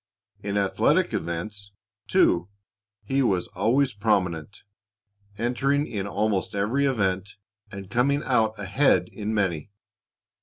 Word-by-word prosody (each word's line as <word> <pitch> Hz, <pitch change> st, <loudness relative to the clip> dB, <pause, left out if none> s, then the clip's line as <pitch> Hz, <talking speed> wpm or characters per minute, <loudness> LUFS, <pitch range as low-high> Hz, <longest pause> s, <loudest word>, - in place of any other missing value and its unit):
In 100 Hz, 0 st, -2 dB
athletic 100 Hz, -, +2 dB
events, 100 Hz, +3 st, -4 dB, 0.3 s
too, 85 Hz, +2 st, +3 dB, 0.5 s
he 135 Hz, +1 st, 0 dB
was 95 Hz, -8 st, +1 dB
always 125 Hz, +7 st, +1 dB
prominent, 95 Hz, -5 st, -1 dB, 0.7 s
entering 135 Hz, +5 st, +1 dB
in 100 Hz, -8 st, -4 dB
almost 100 Hz, -1 st, -1 dB
every 120 Hz, +8 st, +1 dB
event, 100 Hz, -5 st, -1 dB, 0.4 s
and 100 Hz, -1 st, -8 dB
coming 140 Hz, +8 st, +1 dB
out 110 Hz, -4 st, +1 dB
ahead 100 Hz, +9 st, +2 dB
in 105 Hz, 0 st, -4 dB
many. 95 Hz, -5 st, -1 dB
105 Hz, 110 wpm, -25 LUFS, 95-125 Hz, 0.7 s, too